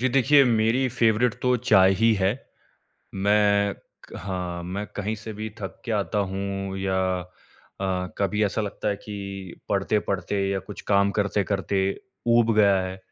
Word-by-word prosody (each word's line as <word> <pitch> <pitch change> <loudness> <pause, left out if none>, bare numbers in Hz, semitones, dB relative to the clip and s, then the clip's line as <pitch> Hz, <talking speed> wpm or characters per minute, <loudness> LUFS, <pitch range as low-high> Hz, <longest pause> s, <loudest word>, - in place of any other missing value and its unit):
जी, 130 - +2
देखिए 135 +2 +5
मेरी 120 +2 +2
फ़ेवरेट 115 -1 +2
तो 125 0 +3
चाय 95 -6 +5
ही 115 0 +5
है। 95 +2 +3 0.8
मैं 100 0 +3
क - - -24 0.4
हाँ, 90 -2 -4
मैं 95 +4 -4
कहीं 105 +2 -2
से 110 +1 -8
भी 110 +1 -5
थक 95 -4 -7
के 120 - -2
आता 105 0 -1
हूँ 95 0 -4
या 95 0 -1 0.2
अ, 90 +1 -6
कभी 105 +1 0
ऐसा 105 +2 -1
लगता 105 0 -3
है 100 - 0
कि 100 -3 -7
पढ़ते-पढ़ते 100 0 0
या 100 - 0
कुछ 105 - -9
काम 100 0 +4
करते-करते 100 -1 0 0.5
ऊब 115 -1 +4
गया 100 -2 +5
है, 95 0 -5
100 Hz, 155 wpm, -25 LUFS, 95-110 Hz, 0.8 s, देखिए